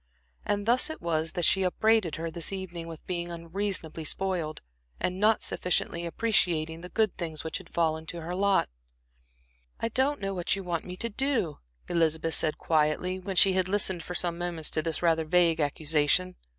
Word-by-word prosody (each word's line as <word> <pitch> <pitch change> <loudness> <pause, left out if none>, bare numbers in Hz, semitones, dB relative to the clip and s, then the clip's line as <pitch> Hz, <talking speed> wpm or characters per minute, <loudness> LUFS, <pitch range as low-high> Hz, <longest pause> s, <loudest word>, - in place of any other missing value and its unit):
And 205 0 0
thus 245 +6 +4
it 315 - -6
was 160 -2 -1
that 175 -3 0
she 195 - +4
upbraided 190 -1 +2
her 165 0 -4
this 165 +2 -1
evening 175 -3 -5
with 165 -2 -10
being 175 -1 -3
unreasonably 170 -1 -3
spoiled, 170 -1 -2 0.4
and 185 +1 -1
not 215 +2 +3
sufficiently 170 -1 -1
appreciating 165 -5 0
the 180 - -9
good 220 -2 +1
things 160 -3 -5
which 160 -1 -3
had - - -14
fallen 160 -1 0
to 170 +1 -6
her 170 +2 -5
lot. 195 +1 +2 1.1
"I 230 - -1
don't 265 +5 +1
know 195 0 -2
what 180 0 0
you 195 - -5
want 175 -2 -3
me 180 0 -7
to 235 - -1
do," 230 - 0 0.3
Elizabeth 165 -1 +1
said, 155 -1 +1
quietly, 160 +4 +1
when 190 +1 -5
she 190 +1 +6
had 185 0 +1
listened 190 -3 +2
for 180 - -7
some 170 -1 0
moments 170 -3 -1
to 155 - +1
this 165 +1 -1
rather 165 -1 +3
vague 165 0 +3
accusation. 155 +4 +1
175 Hz, 185 wpm, -28 LUFS, 160-190 Hz, 1.1 s, she